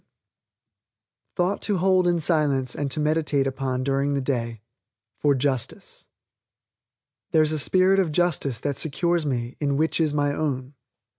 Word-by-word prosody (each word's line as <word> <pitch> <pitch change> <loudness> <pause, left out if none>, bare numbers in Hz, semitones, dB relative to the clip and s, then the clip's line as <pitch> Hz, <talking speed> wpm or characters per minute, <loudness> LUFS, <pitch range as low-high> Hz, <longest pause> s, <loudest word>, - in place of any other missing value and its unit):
THOUGHT 180 +2 0
TO 205 -3 0
HOLD 185 0 +3
IN 175 -1 +2
SILENCE 145 -6 +1
AND 145 -1 -2
TO 135 - 0
MEDITATE 150 -2 +1
UPON 130 -1 -2
DURING 140 +1 0
THE 140 - 0
DAY 115 -5 -3 0.6
FOR 145 -1 +3
JUSTICE 130 -2 -3 1.2
"There's 155 -1 +3
a 155 - -1
Spirit 185 +5 +3
of 180 -5 +1
Justice 150 -7 0
that 145 -2 -2
Secures 170 +1 0
me 120 -2 -3
in 140 -2 0
Which 160 +2 +1
is 155 -2 +2
My 145 -1 0
Own." 140 -3 -3
145 Hz, 145 wpm, -24 LUFS, 135-160 Hz, 1.2 s, HOLD